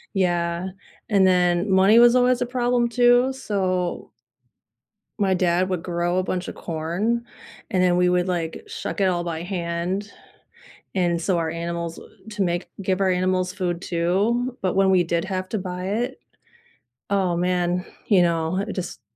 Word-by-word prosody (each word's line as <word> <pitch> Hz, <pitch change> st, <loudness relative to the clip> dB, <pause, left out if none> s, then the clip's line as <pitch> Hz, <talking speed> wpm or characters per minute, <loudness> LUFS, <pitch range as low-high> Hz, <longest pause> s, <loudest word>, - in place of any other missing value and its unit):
Yeah, 175 Hz, -1 st, 0 dB, 0.4 s
and 200 Hz, -3 st, +4 dB
then 180 Hz, +1 st, +2 dB
money 190 Hz, +4 st, +5 dB
was 240 Hz, 0 st, +7 dB
always 250 Hz, 0 st, +3 dB
a -, -, +2 dB
problem 245 Hz, -1 st, +1 dB
too, 245 Hz, +2 st, +4 dB
so 185 Hz, -8 st, -2 dB, 1.1 s
my 195 Hz, -2 st, +2 dB
dad 180 Hz, 0 st, +1 dB
would 180 Hz, -3 st, -2 dB
grow 175 Hz, 0 st, -1 dB
a 185 Hz, -, +2 dB
bunch 180 Hz, -1 st, -3 dB
of -, -, -6 dB
corn, 175 Hz, +9 st, -2 dB, 0.5 s
and 185 Hz, -4 st, +1 dB
then 180 Hz, -1 st, +3 dB
we 180 Hz, 0 st, +3 dB
would 180 Hz, 0 st, +1 dB
like 170 Hz, -3 st, -3 dB
shuck -, -, -5 dB
it 195 Hz, -, +3 dB
all 175 Hz, -1 st, -1 dB
by 165 Hz, -1 st, -4 dB
hand, 180 Hz, +2 st, -3 dB, 0.8 s
and 175 Hz, -2 st, +1 dB
so 180 Hz, 0 st, +1 dB
our 165 Hz, -1 st, -1 dB
animals 170 Hz, 0 st, -4 dB, 0.3 s
to 210 Hz, -, -4 dB
make 175 Hz, -1 st, -1 dB
give 190 Hz, 0 st, 0 dB
our 190 Hz, -, +3 dB
animals 185 Hz, 0 st, 0 dB
food 180 Hz, -3 st, -2 dB
too, 205 Hz, +10 st, 0 dB
but 185 Hz, -1 st, 0 dB
when 195 Hz, 0 st, +4 dB
we 185 Hz, -2 st, +4 dB
did 170 Hz, +1 st, -1 dB
have 185 Hz, -1 st, -3 dB
to 220 Hz, -, -2 dB
buy 180 Hz, 0 st, -5 dB
it 240 Hz, +6 st, -2 dB, 0.9 s
oh 190 Hz, -3 st, +1 dB
man, 180 Hz, 0 st, 0 dB, 0.2 s
you 195 Hz, -4 st, +5 dB
know, 170 Hz, +2 st, 0 dB
just 185 Hz, -, -5 dB
185 Hz, 165 wpm, -23 LUFS, 175-200 Hz, 1.1 s, was